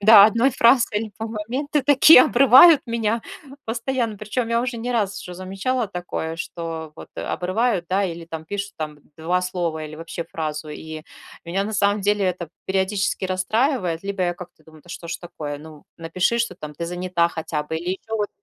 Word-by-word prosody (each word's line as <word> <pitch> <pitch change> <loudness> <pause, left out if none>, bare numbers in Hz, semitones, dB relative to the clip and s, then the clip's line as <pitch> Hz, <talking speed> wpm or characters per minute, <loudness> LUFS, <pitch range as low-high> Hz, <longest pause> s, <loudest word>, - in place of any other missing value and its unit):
да, 210 -1 +9
1 230 +5 +2
фразой 235 -3 +4
иль 220 -1 -5
по 220 - -3
моменты 255 +7 -2
такие, 285 -1 +8
обрывают 275 +5 +8
меня 230 -1 -1 0.4
постоянно. 230 -1 -2
Причём 220 +3 -3
я 230 0 +2
уже 245 -1 -3
не 245 +2 -3
раз 200 -4 -1
уже 180 - -8
замечала 195 +7 -2
такое, 175 -3 -5
что 165 -2 -6
вот, - - -11
а, - - -3
обрывают, 190 +2 0
да, 195 +1 +2
или 170 -2 -5
там 160 -1 -7
пишут 200 +3 -4
там 150 -1 -5 0.2
2 180 +3 0
слова 170 -4 -2
или 155 0 -8
вообще 165 +1 -6
фразу. 155 -1 -5
И 155 +1 -8 0.4
меня, 185 +4 -1
на 215 - -4
самом 205 0 +2
деле, 205 +1 +1
это 180 -3 -2 0.2
периодически 190 0 0
расстраивает. 185 - 0
Либо 200 -1 -2
я 175 -1 0
как-то 175 -2 -12
думаю: 155 -1 -17
"Да - - -21
что 170 -1 -8
ж - - -4
такое? 150 -4 -6
Ну, 155 0 -13
напиши, 180 +7 0
что 230 -6 -1
там 150 -3 -8
ты 170 - -4
занята 175 -1 0
хотя 160 -2 -3
бы". 160 +2 -4
Или 175 +2 -3
ещё 220 +4 -4
вот 205 - 0
190 Hz, 190 wpm, -22 LUFS, 170-225 Hz, 0.4 s, да